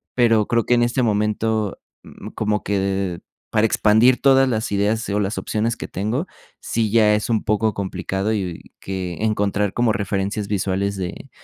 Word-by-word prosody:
pero 115 -4 +3
creo 115 -2 +1
que - - +2
en 120 - +2
este 120 +2 +1
momento, 105 -1 0 0.6
como 105 -1 -1
que 95 -3 -1 0.3
para 110 0 +3
expandir 110 +4 +4
todas 135 -1 +5
las 110 -3 -2
ideas 105 +3 0
o 100 +1 0
las 105 +1 -2
opciones 115 +2 -1
que - - -6
tengo, 110 - -2 0.3
sí, 110 -2 -1
ya 110 -2 +5
es 105 +3 -2
un 115 -2 +1
poco 110 +1 +1
complicado 95 +2 -2
y 90 -5 -5
que 95 -3 -5
encontrar 105 -2 0
como 120 -2 +2
referencias 100 +1 -2
visuales 100 0 -1
de 90 -2 -6
105 Hz, 165 wpm, -21 LUFS, 100-110 Hz, 0.6 s, todas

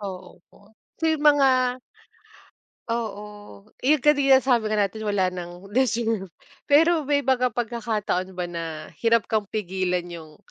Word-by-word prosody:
Oo 185 -2 -8
po, 205 +1 -22 0.3
so - - -2
yung 310 -1 -1
mga 260 -4 +4 1.1
oo, 210 - -6 0.2
eh, 295 +4 +4
yung 255 - -17
kanina 280 -3 +5
sabi 245 -5 +1
nga 215 - 0
natin 205 +1 -1
wala 200 -4 0
ng 180 +3 -9
deserve. 230 -6 0 0.4
Pero 325 +3 +5
may 285 -1 0
mga 255 -1 +2
pagkakataon 215 -6 -3
ba 180 - -2
na 165 -3 -7
hirap 230 -1 +3
kang 215 -2 -2
pigilan 185 -3 -2
yung 165 -3 -11
215 Hz, 145 wpm, -24 LUFS, 185-255 Hz, 1.1 s, kanina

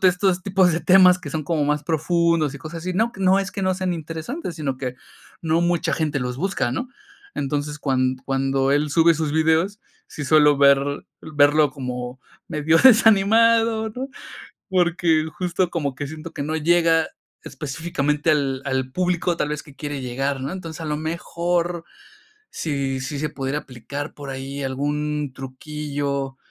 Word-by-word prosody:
estos 185 0 +2
tipos 190 -2 +3
de 165 - -1
temas 185 0 +6
que 145 - -7
son 155 +1 -3
como 155 -1 0
más 150 0 0
profundos 165 -1 +1
y - - -7
cosas 155 +4 -7
así, 185 +2 -3
no 225 +5 +1
q 195 - -12
no 190 +1 +5
es 195 0 -3
que 195 - -4
no 185 0 +2
sean 185 -1 -1
interesantes, 165 - -6
sino 140 -5 -2
que, 125 -1 -5 0.5
no 165 0 +2
mucha 175 0 +1
gente 155 -2 -1
los 125 0 -3
busca, 190 -6 -1
¿no? 250 - -3 0.5
Entonces, 145 +1 -2
cuan 130 -3 0
cuando 135 0 +1
él 145 +1 +1
sube 165 +2 +5
sus 155 -1 -2
videos, 160 +6 +2 0.3
sí 150 - -6
suelo 150 0 +5
ver 140 0 +3 0.2
verlo 150 -1 +3
como 125 -1 -5 0.3
medio 155 +2 +2
desanimado, 225 -1 +5
¿no? 255 +5 -5 0.6
Porque 170 -3 +2
justo 180 0 0
como 145 -6 -2
que 145 - -4
siento 155 +2 -8
que - - -4
no 155 +2 -2
llega 165 0 +3 0.4
específicamente 150 +2 -2
al 140 -3 0
al 130 -1 -2
público 180 0 0
tal 150 - -1
vez 150 -1 -3
que 145 - -15
quiere 145 -2 -5
llegar, 135 +2 -2
¿no? 135 +4 -4
Entonces, 165 -4 -7
a - - -5
lo 150 -1 -1
mejor, 170 +2 -2 0.7
si 140 -4 -2
si 140 +2 -4
se 155 +1 -1
pudiera 135 +1 -3
aplicar 140 +3 -7
por 140 -1 -9
ahí 135 +1 -5
algún 145 +1 -2
truquillo, 140 0 -4
155 Hz, 165 wpm, -22 LUFS, 140-175 Hz, 0.7 s, temas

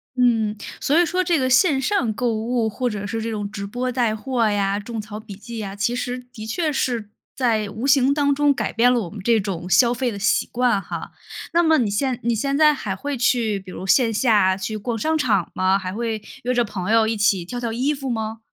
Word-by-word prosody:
嗯， 225 -4 +2 0.2
所 295 +4 +2
以 350 - +4
说 365 +3 0
这 345 -2 +2
个 260 -2 0
线 270 +2 +4
上 270 - +1
购 240 +1 -1
物 225 +1 -1
或 250 +4 -2
者 205 -2 -5
是 225 +2 -3
这 230 - -3
种 205 -2 -3
直 200 -2 -5
播 245 +4 -3
带 240 -3 +1
货 235 0 0
呀、 200 -1 0
种 225 +2 -6
草 210 0 -7
笔 215 -2 -10
记 225 +3 -8
呀， 200 -2 -5
其 205 +4 0
实， 250 0 -3 0.2
的 215 -3 -8
确 310 +7 -1
是 235 -6 -1 0.3
在 225 -5 +1
无 220 +5 -5
形 270 -1 +4
当 285 -1 +2
中 290 +1 +3
改 275 - -2
变 240 +2 +4
了 245 -2 +2
我 180 - -5
们 205 - -8
这 230 +3 +3
种 185 -3 -4
消 240 +5 +5
费 245 0 -1
的 205 - -6
习 200 0 +1
惯 240 -4 +2
哈。 - - -7 0.4
那 340 - +5
么 320 -2 +4
你 230 -6 +1
现 250 +4 -1
你 235 +1 +1
现 275 +5 -1
在 305 0 +6
还 205 -8 -4
会 285 +8 -4
去， 230 -4 +1
比 190 -1 -13
如 185 - -7
线 230 +4 +3
下 210 -5 +3
去 200 +3 -4
逛 230 +2 -3
商 315 +8 0
场 210 - +1
吗？ 185 +1 +2
还 185 -2 -5
会 220 -1 -3 0.2
约 250 +1 0
着 240 -1 +2
朋 195 -3 -4
友 225 -1 +4
一 225 - 0
起 200 -4 +2
挑 245 +7 -5
挑 235 -2 -3
衣 260 +6 0
服 270 -2 -5
吗？ 220 -1 -3
230 Hz, 260 characters per minute, -22 LUFS, 210-255 Hz, 0.4 s, 在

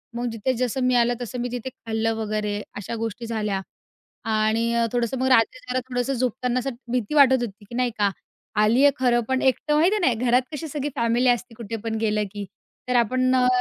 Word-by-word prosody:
मग 240 +1 -2
जिथे 225 +3 -1
जसं 255 +1 -1
मी 250 0 +3
आलं 240 0 +3
तसं 245 +1 -5
मी 245 0 -2
तिथे 245 +1 -4
खाल्लं 225 -2 -2
वगैरे 210 -1 -2 0.2
अशा 205 +3 -5
गोष्टी 225 +1 -4
झाल्या 210 -4 -2 0.7
आणि 220 +2 +1
अ, 235 0 +2
थोडंसं 240 +1 0
मग 260 - +1
रात्री 255 0 +3
जरा 255 - +1
थोडंसं 245 +1 -1
झोपताना 250 0 0
असं 270 - -2 0.2
भीती 245 0 -1
वाटत 270 -3 +7
होती, 210 -3 -6
की 235 - -10
नाही 250 -1 +1
का? 200 -1 +4 0.5
आली 230 +6 +4
आहे 285 - +7
खरं 245 -2 +3
पण 260 0 +1
एकटं, 295 +3 +2
माहिती 345 +7 +4
आहे - - 0
नाही 250 - +3
घरात 250 +2 +5
कशी 320 +2 -4
सगळी 295 -1 -3
फॅमिली 235 +2 +2
असते 245 0 0
कुठे 230 -1 -5
पण 225 -1 -2
गेलं, 210 -1 +1
की 205 -1 -6 0.4
तर 250 - +1
आपण 255 +3 +1
अ, 250 0 +4
240 Hz, 210 wpm, -24 LUFS, 225-255 Hz, 0.7 s, वाटत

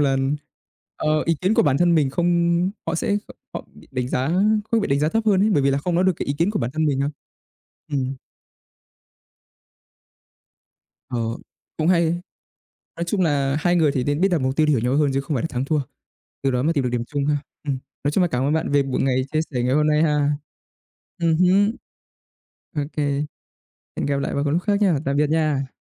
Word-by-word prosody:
là, 135 -2 +2 0.8
ờ, 155 0 +1
ý 165 - +3
kiến 190 +4 +2
của - - +4
bản 140 -3 +2
thân 175 -1 +4
mình 145 -4 +2
không 170 +3 +2 0.2
họ 165 - -1
sẽ 200 +4 0
kh - - -14 0.2
họ - - -6
bị - - -17
đánh 130 -1 -2
giá 130 +4 0 0.4
không 230 - +3
bị 205 - -2
đánh 140 +1 +2
giá 150 - +2
thấp 225 +5 0
hơn 195 -3 +4
ấy, 215 - +3
bởi 145 -9 +3
vì 140 - +3
là 135 - +1
không 170 +4 -2
nói 180 - +3
được 185 - +4
cái - - -4
ý 140 - 0
kiến 170 +4 +2
của 210 - -1
bản 120 +1 -2
thân 155 0 +1
mình 135 -2 +1
đâu. 140 +1 0 0.8
Ừm. 135 -1 -1 2.9
Ờ, 125 - -2 0.6
cũng 155 +1 0
hay. 170 -1 +2 0.7
Nói 170 - -3
chung 185 +2 0
là 140 -4 +1
hai 175 +2 +2
người 160 -4 +3
thì 130 -2 -1
nên 145 +5 -1
biết 195 - +5
đặt 170 -5 +1
mục 130 +1 0
tiêu 155 - +3
để 150 - +2
hiểu 135 - +3
nhau 125 +4 0
hơn 145 -2 +2
chứ 135 - +1
không 140 +1 -3
phải 120 - -1
là - - 0
thắng 130 -3 -3
thua. 155 +1 +1 0.6
Từ 135 - +2
đó 125 0 0
mà 165 +3 +2
tìm 140 -4 0
được 125 - 0
điểm 120 -1 -1
chung 140 +2 -2
ha. 150 0 +2 0.3
Ừm, 140 -3 -2 0.3
nói 145 - +1
chung 185 - +2
là 180 - +3
cảm 125 -5 -1
ơn 145 +2 +1
bạn 160 -2 -1
về 140 -1 +4
buổi 135 -2 -2
ngày 130 -1 +2
chia 155 - +1
sẻ 125 -3 -1
ngày 125 +2 +1
hôm 150 +1 +3
nay 150 +1 +3
ha. 150 -2 +2 0.9
Ừm 165 -2 +2
hứm. 195 +4 +4 1.0
OK, 145 +1 -4 1.0
hẹn - - -1
gặp 140 - 0
lại 140 - -2
vào 140 - 0
một 145 - 0
lúc 170 +4 +1
khác 205 -1 +1
nhá. 185 -8 +3
Tạm 140 - 0
biệt 150 0 +2
nha! 150 -4 0
150 Hz, 230 wpm, -22 LUFS, 135-170 Hz, 2.9 s, biết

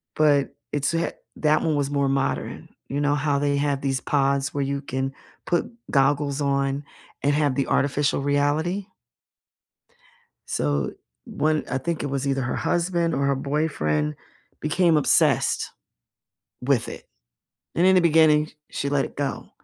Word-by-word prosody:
but 145 -2 +3 0.2
it's 145 +2 0
a 165 - +1
ha 170 - -1 0.3
that 155 0 +3
one 160 -2 +1
was 145 -1 0
more 140 -1 +1
modern. 135 0 -2 0.2
You 140 +2 -2
know 145 0 +2
how 145 -1 +1
they 145 0 +1
have 140 -1 0
these 135 -2 -1
pods 140 -1 +1
where 140 -1 0
you 140 +1 -2
can 135 0 -3 0.3
put 175 +5 0 0.2
goggles 140 +1 +2
on 140 0 0 0.4
and 145 +1 +3
have 145 -2 +1
the 140 - 0
artificial 140 0 +1
reality? 150 +7 0 1.6
So, 70 -1 -1 0.3
one 155 0 0
I 135 - 0
think 165 +3 -3
it 145 - -2
was 140 0 -2
either 135 -1 0
her 120 - -2
husband 170 -1 0
or 140 +1 0
her 140 - +2
boyfriend 130 - -1 0.5
became 165 +2 +3
obsessed 150 - +2 0.9
with 125 -2 +1
it, - - -10 0.7
and 175 - +3
in 190 - +6
the 185 - +6
beginning, 155 -2 +5 0.2
sh - - -5
she 140 - 0
let 140 -1 +1
it - - -9
go, 140 -1 -3
145 Hz, 160 wpm, -24 LUFS, 135-155 Hz, 1.6 s, in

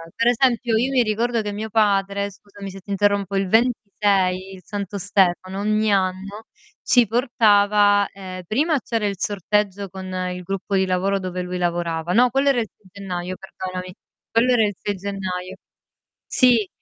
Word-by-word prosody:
per 230 - +1
esempio, 240 -1 +2
io 245 +4 +1
mi 255 -2 +3
ricordo 230 +2 0
che 210 -1 -4
mio 215 +2 -5
padre, 200 -2 +1
scusami 200 0 -11
se 195 - -10
ti 190 - -20
interrompo, 200 -1 +1
il 195 -1 0
26, 200 -5 +1
il 190 - -11
Santo 200 -1 -5
Stefano, 190 -1 +1
ogni 215 +1 +1
anno 195 +2 -1 0.4
ci 245 -3 +4
portava, 205 -3 +3
ehm, 185 -1 -8
prima 295 - +1
c'era 225 -3 -2
il 200 - -2
sorteggio 200 0 -1
con 190 +1 -8 0.3
il 180 0 -6
gruppo 195 +2 -3
di 190 0 +3
lavoro 190 +2 0
dove 185 -1 -4
lui 180 0 -4
lavorava 170 -1 -1
no, 245 +4 +5
quello 270 +3 +1
era 265 -4 +3
il 220 - -5
6 205 - -24
gennaio 185 -2 -5
perdonami. 185 -1 -7 0.4
Quello 235 +3 +3
era 225 -3 +4
il 205 -1 -2
6 205 - -3
gennaio. 190 -2 -5 0.7
Sì, 240 -6 +3
200 Hz, 170 wpm, -22 LUFS, 185-220 Hz, 0.7 s, no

